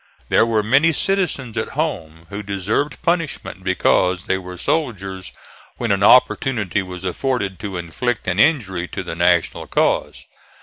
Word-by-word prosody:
There 115 - +4
were 110 -2 +1
many 135 +9 +4
citizens 165 - -1
at - - -2
home 80 - -3
who 100 +1 -5
deserved 100 - -2
punishment 165 - -2
because 90 -1 +2
they 95 - 0
were 90 -1 -9
soldiers 95 - -2 0.5
when - - -1
an 100 0 +1
opportunity 110 -3 +3
was 90 -1 -8
afforded 100 0 -2
to 100 -3 -5
inflict 100 +8 -3
an 90 +1 0
injury 100 - +2
to - - -5
the 85 - -5
National 85 0 +1
cause. - - 0
100 Hz, 145 wpm, -20 LUFS, 90-130 Hz, 0.5 s, There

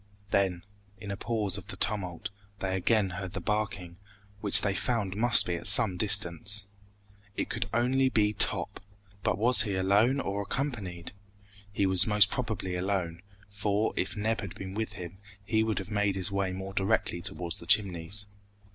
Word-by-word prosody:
Then, 95 -3 0 0.3
in 100 0 -8
a - - -3
pause 105 -2 -1
of - - -15
the - - -8
tumult, 90 -3 -2 0.3
they 95 -1 -3
again 95 +1 +1
heard 95 0 -7
the - - -4
barking, 100 -5 -4 0.4
which 100 -1 +9
they 100 - 0
found 100 -2 -2
must 115 +1 +3
be 90 - -3
at 85 - +3
some 100 -6 +8
distance. 100 0 +1 0.7
It - - -4
could 95 - -4
only 130 +3 +1
be 105 -3 +1
Top! - - 0 0.4
But - - -1
was 120 +4 +5
he 105 -4 -2
alone 100 +8 +2
or 100 -5 -3
accompanied? 100 -8 -5 0.6
He 100 0 -1
was 95 +1 +4
most 105 -2 +4
probably 110 -7 -4
alone, 90 -2 -3 0.3
for, 100 +1 -2
if 95 +4 -3
Neb 110 +2 -2
had 100 -4 -8
been 95 0 -8
with 110 0 -4
him, 90 -1 -9 0.3
he 110 +2 0
would 110 -1 -2
have 95 0 -6
made 105 -2 0
his 95 +1 -2
way 100 -1 -2
more 95 +1 -7
directly 95 -3 -1
towards 90 -2 -4
the 85 - -13
Chimneys. 95 +1 0
100 Hz, 175 wpm, -28 LUFS, 95-110 Hz, 0.7 s, which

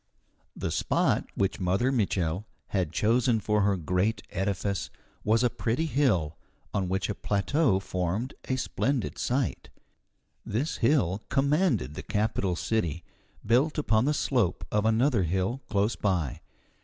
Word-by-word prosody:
The - - -3
spot - - +1
which 100 0 0
Mother 95 +8 +1
Mitchel 95 -6 0 0.2
had 90 -6 0
chosen 115 +1 +2
for 105 0 +1
her 100 -1 +2
great 90 +6 0
edifice 100 0 -1 0.3
was 110 +3 +3
a 125 - +4
pretty 125 +8 -1
hill 110 - +1 0.3
on 95 -3 0
which 95 0 0
a 105 - -1
plateau 105 +3 +1
formed 95 +6 -2
a 130 - 0
splendid 130 0 -1
site. 130 +1 -1 0.7
This 125 +10 -2
hill 105 - +2
commanded 140 - +2
the - - -6
capital 105 -3 0
city, 85 -5 -1 0.4
built 130 +9 +3
upon 115 -6 +2
the 150 +1 +2
slope 120 -11 0
of 105 0 +1
another 115 +1 +3
hill 95 +9 -1
close 105 +2 +1
by. 90 -9 -1
105 Hz, 135 wpm, -28 LUFS, 95-125 Hz, 0.7 s, a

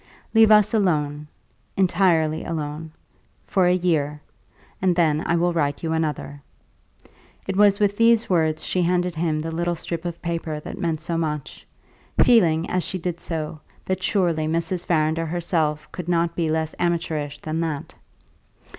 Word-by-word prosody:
"Leave 225 -1 +6
us 210 -1 +5
alone 150 -8 0 0.5
entirely 175 -4 +2
alone 155 -1 -5 0.5
for 185 -3 +2
a 180 - +4
year, 155 -5 0 0.6
and 185 -2 +2
then 155 -3 +2
I 170 - +2
will 175 +1 +1
write 145 -3 -1
you 160 -1 -1
another": 150 -3 -3 1.1
it 190 - -2
was 205 0 +4
with 205 -1 +1
these 230 0 +4
words 160 -3 +1
she 185 - 0
handed 180 0 +1
him 160 -1 -1
the 165 +1 -4
little 175 +1 -1
strip 170 0 -5
of 170 -1 -5
paper 165 -2 -3
that - - -8
meant 160 -2 -1
so 165 +1 -2
much, 150 -3 -4 0.5
feeling, 170 -8 +4
as 180 -1 -1
she 185 - -3
did 175 -1 -4
so, 155 -2 -4 0.3
that 185 0 -2
surely 175 -6 +1
Mrs. 170 +2 -1
Farrinder 160 0 +1
herself 160 -3 -1
could 180 -1 -6
not 170 -1 +1
be 165 -2 0
less 160 0 -1
amateurish 165 -4 -1
than 155 +1 -4
that. 160 -4 -3
165 Hz, 155 wpm, -23 LUFS, 155-180 Hz, 1.1 s, Leave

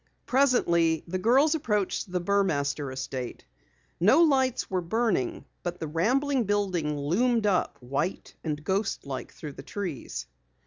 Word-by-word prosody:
Presently 170 - +3
the 185 +2 -2
girls 265 - +4
approached 210 - -1
the 180 - 0
Burmaster 155 -7 0
estate. 130 -1 -5 0.5
No 220 - +6
lights 265 -5 +2
were 185 -1 -1
burning, 180 - 0 0.2
but 175 0 -4
the - - -3
rambling 245 - +1
building 185 -7 0
loomed 215 - +1
up 190 -7 +1
white 140 +9 -2
and 150 -2 -3
ghost 195 +1 -1
like 135 -2 -5
through 150 -3 -8
the 135 - -9
trees. 170 - -5
185 Hz, 135 wpm, -27 LUFS, 150-230 Hz, 0.5 s, No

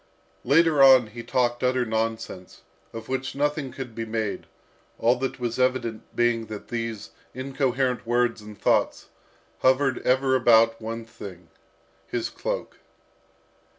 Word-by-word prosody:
Later 150 +2 +4
on 130 -3 +8
he 115 +2 -9
talked 120 0 0
utter 125 0 +2
nonsense, 110 -4 -4 0.3
of 115 -1 -8
which 130 +1 -3
nothing 145 -1 -1
could 130 -2 -7
be 115 - -4
made, 110 -2 -3 0.5
all 120 +2 +3
that 130 +1 -3
was 120 0 -3
evident 125 -3 -1
being 120 -1 +1
that 105 -2 -8
these 115 -3 -4 0.2
incoherent 130 -2 -1
words 120 -1 +1
and 105 -1 -12
thoughts - - +1 0.5
hovered 130 0 +2
ever 130 +1 +2
about 115 -2 +4
one 115 +1 -5
thing, 90 -6 -11 0.6
his 120 -2 -3
cloak. - - -4
120 Hz, 130 wpm, -25 LUFS, 115-130 Hz, 0.6 s, on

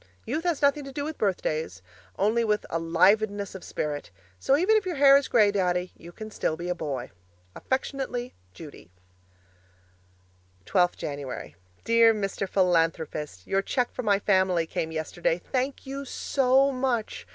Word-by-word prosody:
Youth 325 +3 -3
has 330 -4 0
nothing 280 +1 +3
to 275 - -8
do 285 +1 -4
with 310 +1 -5
birthdays, 155 - -2 0.3
only 220 +4 +2
with 210 -2 0
ALIVEDNESS 195 +5 +2
of 190 - -9
spirit, 150 -1 -4 0.3
so 275 - +3
even 380 +7 +3
if 430 - +3
your 365 -3 -3
hair 275 -1 +7
is 280 0 +3
grey, 210 -3 +4
Daddy, 180 -2 0
you 170 - -12
can 215 +4 -9
still 160 - -2
be 175 +1 -5
a - - +1
boy. 140 -7 -5 0.4
Affectionately, 260 -2 -3 0.2
Judy 145 - -12 1.8
12th 180 -1 +2
Jan. 140 - -6 0.3
Dear 230 -1 +5
Mr. 195 -2 -3
Philanthropist, 165 - 0
Your 195 - +1
cheque 245 +4 -1
for - - -4
my 205 -4 +3
family 185 -4 +2
came 160 0 -3
yesterday. 160 +1 -1
Thank 265 +2 -1
you 275 +1 -5
so 270 0 +2
much! 255 -4 -2
200 Hz, 150 wpm, -26 LUFS, 165-265 Hz, 1.8 s, hair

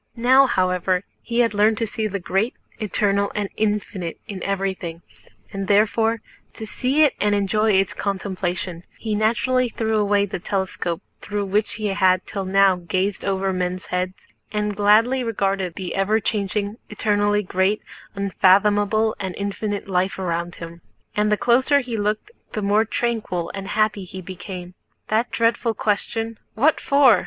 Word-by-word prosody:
Now, 260 +3 +6
however, 185 -3 +1 0.2
he 235 0 +1
had 230 -3 +2
learned 210 +1 +3
to 230 - 0
see 220 0 -2
the 200 -1 -3
great, 195 +6 0 0.2
eternal, 200 -1 +1
and 205 -2 -1
infinite 205 -5 -2
in 195 -3 -6
everything, 190 -4 -3 0.5
and 195 -1 -3
therefore—to 220 +2 0
see 260 +7 +2
it 295 - +4
and 205 0 +3
enjoy 210 +2 +2
its 195 0 +2
contemplation—he 190 0 -3
naturally 235 +4 +2
threw 220 -1 -1
away 205 -1 +3
the 190 - -5
telescope 185 -2 -2 0.2
through 205 0 -2
which 210 +2 0
he 215 - -4
had 185 -1 +3
till 195 -2 -4
now 195 0 +4
gazed 185 +3 -1
over 195 -1 0
men's 180 0 -2
heads, 180 +1 -3 0.2
and 210 -1 -1
gladly 220 +6 +4
regarded 195 -5 -1
the 185 -3 -4
ever 205 +3 +2
changing, 205 0 -2
eternally 205 -1 +1
great, 190 +3 0 0.3
unfathomable, 205 +2 +3
and 190 -2 -4
infinite 205 0 -3
life 190 0 0
around 175 -1 -2
him. 170 0 -9 0.3
And 210 0 +2
the 210 - +3
closer 260 +6 +3
he 245 -3 -5
looked 210 - -1 0.2
the 215 - -2
more 205 +2 +3
tranquil 215 -7 -2
and 195 -1 -6
happy 210 -1 0
he 190 +1 -8
became. 180 -1 -8 0.4
That 225 +3 +1
dreadful 230 0 +1
question, 225 +2 -1 0.2
"What 290 +8 +3
for?" 275 -7 +5
205 Hz, 150 wpm, -22 LUFS, 190-220 Hz, 0.5 s, Now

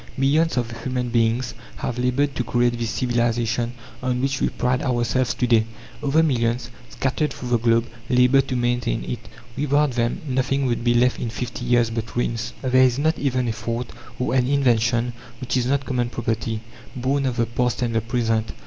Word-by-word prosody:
Millions 145 +3 +2
of 120 -1 0
human 125 0 -2
beings 120 +1 +1 0.2
have 125 0 -3
laboured 130 +3 +1
to 125 - -1
create 120 +1 +1
this 115 -1 -1
civilization 120 -1 0 0.3
on 125 -1 0
which 135 +1 -1
we - - +2
pride 125 +1 0
ourselves 125 0 0
to 125 - 0
day. 115 -2 +4 0.4
Other 150 +3 +3
millions, 120 -5 0 0.2
scattered 135 +3 -1
through 125 - -6
the 120 -1 +3
globe, 115 0 +3 0.2
labour 125 +2 +5
to 130 - -4
maintain 120 0 0
it. 120 - -4 0.4
Without 145 0 +2
them 120 -1 -1
nothing 135 +1 0
would 120 -2 0
be 120 0 +3
left 125 +1 +3
in 120 - -2
fifty 120 +2 -5
years 120 -2 +3
but 115 -1 -4
ruins. 115 -1 -1
There 130 0 +4
is 130 -1 +4
not 160 +3 +1
even 130 -3 0
a 115 - 0
thought, 115 +1 -4 0.3
or 125 - -1
an 125 -1 +3
invention, 120 -3 +2 0.3
which 130 -1 -2
is 125 -1 +1
not 140 +1 +1
common 120 -2 -1
property, 115 -2 -2 0.3
born 135 +2 0
of 125 - -2
the 115 - +2
past 125 +2 -1
and 120 -1 -1
the 115 - +2
present. 115 -1 0
125 Hz, 190 wpm, -23 LUFS, 120-130 Hz, 0.4 s, labour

